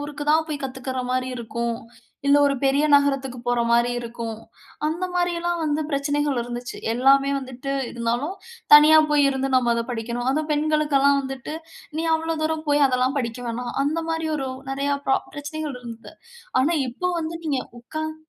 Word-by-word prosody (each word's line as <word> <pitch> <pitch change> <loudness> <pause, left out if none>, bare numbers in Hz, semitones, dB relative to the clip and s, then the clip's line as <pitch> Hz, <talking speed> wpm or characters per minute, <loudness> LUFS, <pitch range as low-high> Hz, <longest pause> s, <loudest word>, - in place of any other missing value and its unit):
ஊருக்கு 290 0 -5
தான் 315 +1 +4
போய் 295 -2 -4
கத்துக்குற 260 0 -4
மாரி 255 0 0
இருக்கும். 235 0 -3 0.5
இல்ல, 280 - +6
ஒரு 280 - +2
பெரிய 280 +2 +3
நகரத்துக்கு 275 -3 +2
போற 245 0 +2
மாரி 235 +1 +3
இருக்கும். 230 -2 -6 0.5
அந்த 325 +4 -1
மாரில்லாம் 345 -1 0
வந்து 300 0 0
பிரச்சனைகள் 285 -1 0
இருந்துச்சு. 240 0 -6 0.2
எல்லாமே 275 +3 +4
வந்துட்டு 265 +1 -6 0.2
இருந்தாலும், 240 +9 -2 0.4
தனியா 305 +1 +9
போய் 290 -1 +4
இருந்து 270 0 -1
நம்ம 240 -2 +3
அத 235 - 0
படிக்கணும். 240 +2 -3
அதுவும் 305 +3 -1
பெண்களுக்கு 300 -1 +1
எல்லாம் 280 0 +4
வந்துட்டு, 270 +2 -6 0.4
"நீ 325 - -1
அவ்ளோ 325 0 -1
தூரம் 315 0 -1
போய் 290 0 +4
அதெல்லாம் 255 +2 +1
படிக்க 235 -2 -3
வேணா." 245 +2 -4 0.2
அந்த 315 +3 0
மாரி 325 0 -1
ஒரு 270 -2 -3 0.2
நிறையா 280 +1 0
பிரா 270 - +4 0.2
பிரச்சனைகள் 290 -1 -5
இருந்துது. 230 -1 -10 0.5
ஆனா, 290 +6 +2 0.2
இப்போ 315 +10 -2
வந்து 320 +1 -4
நீங்க 280 -4 0 0.2
உட்கார்ந்து 315 +5 -5
275 Hz, 165 wpm, -23 LUFS, 250-305 Hz, 0.5 s, தனியா